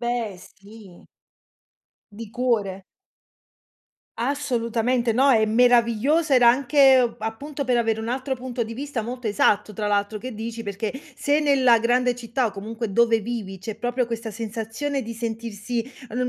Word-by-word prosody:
Beh, 235 -5 -2
sì. 195 +1 -16 1.1
Di 215 +1 -9
cuore. 215 -6 -1 1.3
Assolutamente, 240 -2 0
no, 265 +5 +3
è 220 -4 +5
meraviglioso, 245 +6 +3
era 245 -2 +6
anche, 265 +1 +5
uhm, 235 - -2
appunto 275 +6 -5
per 250 - +2
avere 225 -2 +1
un 220 - -5
altro 260 +2 -2
punto 250 -1 -4
di 230 +1 -7
vista 275 -2 -4
molto 245 +1 -5
esatto 210 0 +2
tra 210 +1 -3
l'altro, 205 +1 0
che 255 +1 -6
dici? 230 +1 -6
Perché 205 +3 -4 0.2
se 290 +2 +1
nella 260 -5 +4
grande 245 +1 +2
città, 240 +1 -2
o 215 - -1
comunque 220 +1 -5
dove 230 0 +4
vivi, 210 -4 -5
c'è 215 +2 -6
proprio 245 +1 -1
questa 230 -1 -5
sensazione 230 +6 -4
di 230 0 -6
sentirsi, 230 0 -4 0.3
uhm, 250 +2 -2
235 Hz, 150 wpm, -23 LUFS, 220-250 Hz, 1.3 s, era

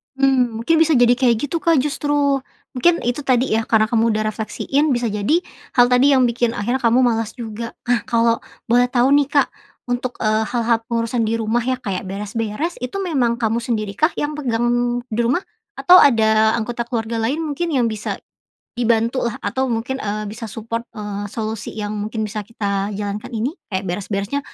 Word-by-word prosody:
Mhm, 255 -4 +2
mungkin 330 +8 +2
bisa 320 -1 +4
jadi 245 -1 +5
kayak 245 -3 +3
gitu, 335 - 0
Kak, 330 -1 +3
justru. 290 -1 +1 0.3
Mungkin 335 +7 +2
itu 245 +4 -2
tadi 255 0 +2
ya, 220 +1 +1
karena 215 -1 +2
kamu 230 -1 +2
udah 215 0 0
refleksiin, 270 +7 -1
bisa 240 -1 0
jadi 210 - +1 0.3
hal 245 -1 +6
tadi 255 +3 +5
yang 260 -2 +4
bikin 235 0 0
akhirnya 240 +6 -1
kamu 235 +2 +4
malas 225 -3 +1
juga. 230 -1 -6 0.2
Nah 245 -1 +3
kalau 230 -2 +2 0.3
boleh 245 +1 +5
tahu 245 +1 +2
nih, 285 - +2
Kak, 285 - +4 0.4
untuk, 245 0 -2
eee, 215 0 +2
hal-hal 235 0 +1
pengurusan 230 0 -1
di 220 - -1
rumah 225 +2 0
ya 255 +1 0
kayak 195 -6 -3
beres-beres, 210 - -3
itu 250 +10 -4
memang 255 -10 0
kamu 225 0 +1
sendiri 215 -4 -2
kah 310 +3 +3
yang 295 0 -2
pegang 240 -1 0
di 225 0 -3
rumah? 265 +10 +1 0.4
Atau 360 +1 +7
ada 220 -5 +5
anggota 235 +1 -3
keluarga 230 -1 -3
lain 275 +8 0
mungkin 320 +2 -2
yang 250 -5 +2
bisa 215 -1 -4 0.6
dibantu 235 +1 +1
lah 235 - -6
atau 265 0 0
mungkin 235 +4 -2
eee, 210 0 -3
bisa 225 +2 -7
support, 230 +2 -4
eee, 205 -1 -5
solusi 220 -1 -4
yang 210 -1 -3
mungkin 215 +1 -3
bisa 210 +1 -4
kita 200 -2 -2
jalankan 205 +3 -4
ini. 225 +4 -1 0.2
Kayak 190 0 -2
beres-beresnya 200 +7 -2
235 Hz, 185 wpm, -20 LUFS, 220-255 Hz, 0.6 s, Atau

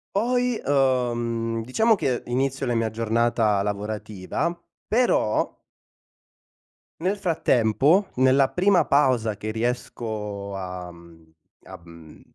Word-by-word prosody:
Poi, 245 +2 +1
uhm, 120 -4 0
diciamo 220 - +2
che 130 - -1
inizio 135 +2 -1
la 120 - 0
mia 115 -1 0
giornata 115 -2 +1
lavorativa, 105 - -3 0.3
però 225 - +1 1.5
nel 185 +4 0
frattempo, 160 - +2
nella 130 +1 +4
prima 185 0 +3
pausa 120 -7 +2
che 110 - -4
riesco 110 -4 -4
a, 90 -2 -6
mhmm 85 -1 -17 0.3
a - - -10
mhmm, 85 -2 -15
115 Hz, 100 wpm, -24 LUFS, 105-140 Hz, 1.5 s, nella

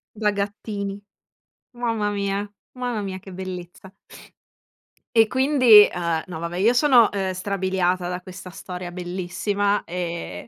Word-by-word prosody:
Da 210 -1 +1
gattini. 200 0 -4 0.7
Mamma 230 -4 -1
mia, 200 0 -1 0.3
mamma 245 -4 -3
mia 190 -1 -5
che 190 0 -12
bellezza. 185 0 -8 1.2
E 225 -1 +6
quindi 255 -5 +7
uhm, 170 -2 -1
no 180 -3 -7
va 170 +1 -3
beh, 175 - -6
io 225 +5 +4
sono, 250 -4 +5
ehm, 190 -2 -2
strabiliata 185 -2 -1
da 180 - -3
questa 185 0 -10
storia 180 0 -7
bellissima. 185 +3 -1
Ehm, 170 - -5
195 Hz, 130 wpm, -23 LUFS, 180-210 Hz, 1.2 s, quindi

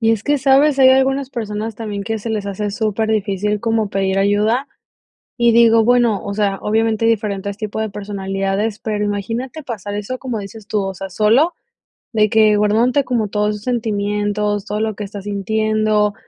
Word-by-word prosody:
Y 225 0 +3
es 220 - -2
que, 290 0 +1
¿sabes? 275 +2 +4
Hay 260 -1 +7
algunas 265 0 +2
personas 220 -2 -4
también 205 -2 -5
que 225 0 -2
se 225 +2 -5
les 210 -2 -2
hace 205 +1 -3
súper 220 0 -1
difícil 210 -1 -1
como 225 -2 0
pedir 195 -1 0
ayuda, 210 +6 +2 0.7
y 235 -1 +4
digo, 230 -1 +5
bueno, 235 -3 +2
o 200 - -4
sea, 200 -2 0
obviamente 220 +1 +1
hay 230 - +5
diferentes 200 -2 -3
tipos 215 0 -4
de 220 - -2
personalidades, 195 +1 -3
pero 210 -2 -2
imagínate 225 +9 -3
pasar 205 -5 -5
eso 210 +5 -4
como 250 -4 -4
dices 205 +1 -10
tú, 210 -2 0
o 195 0 -3
sea, 195 +1 -7
solo 225 - +3 0.6
de 215 -1 +2
que 215 -2 +4
guardándote 230 +7 +2
como 235 -4 -1
todos 210 +1 0
tus 210 - -12
sentimientos, 210 -3 -1
todo 210 - -3
lo 220 0 -1
que 210 - -7
estás 200 0 -8
sintiendo, 215 +1 0
215 Hz, 185 wpm, -18 LUFS, 205-230 Hz, 0.7 s, Hay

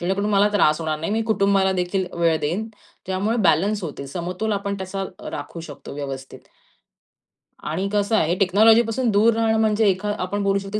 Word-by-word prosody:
जेणेकरून 195 +4 -1
मला 205 +1 +4
त्रास 155 -7 +3
होणार 155 -1 -2
नाही. 165 +6 -2
मी 225 +1 0
कुटुंबाला 200 -3 +2
देखील 185 +1 -1
वेळ 165 -1 +3
देईन. 190 +9 -2 0.4
त्यामुळे 195 +5 -1
बॅलन्स 200 +6 +1
होतील. 140 -4 -6
समतोल 180 +8 -3
आपण 200 0 -2
त्याचा 190 +1 -4 0.3
राखू 145 +3 -7
शकतो 150 -4 -10
व्यवस्थित. 135 -2 -7 1.3
आणि 175 +6 -2
कसं 205 +1 +1
आहे 170 -3 +2
टेक्नॉलॉजीपासून 225 +5 +4
दूर 215 +3 +4
राहणं 220 -1 +1
म्हणजे 215 0 +2
एखा 200 +2 -1
आपण 200 +3 -2
बोलू 200 0 +2
शकतो 195 +2 -4
195 Hz, 165 wpm, -22 LUFS, 175-210 Hz, 1.3 s, मला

